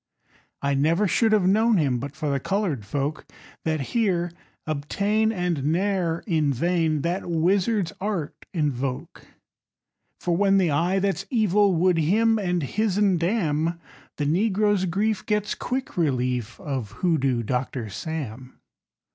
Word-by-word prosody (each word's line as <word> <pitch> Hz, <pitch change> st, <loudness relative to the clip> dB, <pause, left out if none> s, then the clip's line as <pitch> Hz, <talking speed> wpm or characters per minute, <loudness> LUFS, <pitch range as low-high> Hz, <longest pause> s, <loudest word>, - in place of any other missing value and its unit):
_ -, -, -40 dB, 0.3 s
I 140 Hz, 0 st, +1 dB
never 165 Hz, +9 st, +2 dB
should 225 Hz, +4 st, +2 dB
have 210 Hz, -4 st, +3 dB
known 220 Hz, +3 st, +4 dB
him 135 Hz, -7 st, +1 dB
But 140 Hz, +3 st, -6 dB
for 150 Hz, 0 st, -2 dB
the 140 Hz, -, 0 dB
colored 170 Hz, -, -2 dB
folk 145 Hz, +5 st, -2 dB, 0.4 s
That 155 Hz, -2 st, 0 dB
here 180 Hz, -7 st, +1 dB, 0.3 s
obtain 200 Hz, +9 st, 0 dB
And 180 Hz, -8 st, -1 dB
ne'er 175 Hz, 0 st, 0 dB
in 155 Hz, -7 st, +1 dB
vain 160 Hz, +2 st, +1 dB
That 175 Hz, +1 st, -2 dB
wizard's 180 Hz, +3 st, +1 dB
art 195 Hz, -7 st, -4 dB
invoke; 140 Hz, -6 st, -3 dB, 0.9 s
For 175 Hz, -1 st, 0 dB
when 195 Hz, +1 st, +3 dB
the 180 Hz, -5 st, +2 dB
Eye 170 Hz, +6 st, +1 dB
that's 195 Hz, 0 st, -1 dB
Evil 205 Hz, -4 st, +3 dB
Would 175 Hz, 0 st, +3 dB
him 220 Hz, +8 st, +3 dB
and 180 Hz, -4 st, 0 dB
his'n 200 Hz, +2 st, +1 dB
damn, 170 Hz, -3 st, 0 dB, 0.4 s
The 145 Hz, -, -1 dB
negro's 205 Hz, +4 st, +2 dB
grief 200 Hz, +3 st, 0 dB
gets 210 Hz, -1 st, 0 dB
quick 265 Hz, +3 st, -4 dB
relief 125 Hz, -7 st, -1 dB
Of 130 Hz, -8 st, -4 dB
Hoodoo 135 Hz, -9 st, +2 dB
Doctor 125 Hz, 0 st, -2 dB
Sam. 130 Hz, -, -6 dB
170 Hz, 140 wpm, -24 LUFS, 145-200 Hz, 0.9 s, known